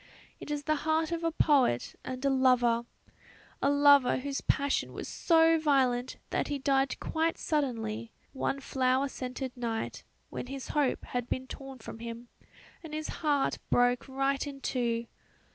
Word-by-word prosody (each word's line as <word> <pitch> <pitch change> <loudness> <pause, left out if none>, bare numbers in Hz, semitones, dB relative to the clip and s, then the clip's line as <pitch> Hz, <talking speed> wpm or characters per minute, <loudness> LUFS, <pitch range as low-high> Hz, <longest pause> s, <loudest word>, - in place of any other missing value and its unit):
It - - -9
is 295 -1 -2
the 310 +1 +1
heart 315 +2 0
of 335 0 -2
a 330 - +1
poet 275 - +2
and 255 +1 -5
a 275 - +4
lover; 245 -3 +3 0.7
a 275 - +3
lover 285 -2 +6
whose 275 +1 -3
passion 280 -1 0
was - - -6
so 325 -1 +4
violent 260 -5 +2
that - - 0
he 290 - -2
died 270 0 +1
quite 325 +1 0
suddenly, 230 -7 -2 0.2
one 275 0 -2
flower 260 0 +1
scented 255 0 -5
night, 230 -2 -3 0.3
when - - -5
his 270 0 -6
hope 290 -4 0
had 245 -1 -3
been 260 - -2
torn 270 0 -9
from 225 -1 -9
him, 235 +1 -7 0.5
and 310 -2 -7
his 310 0 -4
heart 290 -3 +1
broke 245 +1 +3
right 275 +1 0
in 275 -1 -7
two. 235 -3 -1
270 Hz, 160 wpm, -30 LUFS, 245-290 Hz, 0.7 s, lover